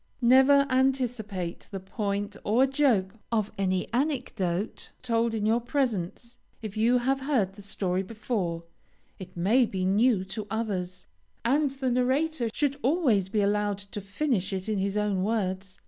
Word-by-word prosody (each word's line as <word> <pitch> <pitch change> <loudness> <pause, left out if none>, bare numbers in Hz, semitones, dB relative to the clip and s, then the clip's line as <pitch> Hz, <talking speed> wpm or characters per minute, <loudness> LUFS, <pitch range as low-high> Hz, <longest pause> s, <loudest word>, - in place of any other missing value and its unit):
Never 265 +3 +6
anticipate 245 -9 -1
the 195 - -5
point 200 +1 -3
or 235 +6 +4
joke 240 -8 +1
of 215 -2 0
any 185 -2 0
anecdote 225 - -2
told 230 -2 +1
in 210 -1 -1
your 225 +2 +2
presence. 240 -3 -2 0.2
If 215 -3 -7
you 230 +3 +3
have 265 +2 +1
heard 260 -9 0
the 205 - -12
story 190 -2 -1
before, 195 -5 -3 0.6
it 185 -1 -10
may 225 +8 +3
be 185 -3 -2
new 205 +1 +3
to 205 +2 -6
others, 185 -5 -3 0.4
and 285 +4 +3
the 265 -1 -2
narrator 260 +1 +1
should 280 +3 0
always 250 - +2
be 210 +1 +1
allowed 205 0 +1
to 200 +1 -8
finish 200 0 -1
it 190 0 -3
in 215 -2 0
his 200 +1 -1
own 205 -3 0
words. 190 -3 -2
215 Hz, 150 wpm, -27 LUFS, 195-255 Hz, 0.6 s, Never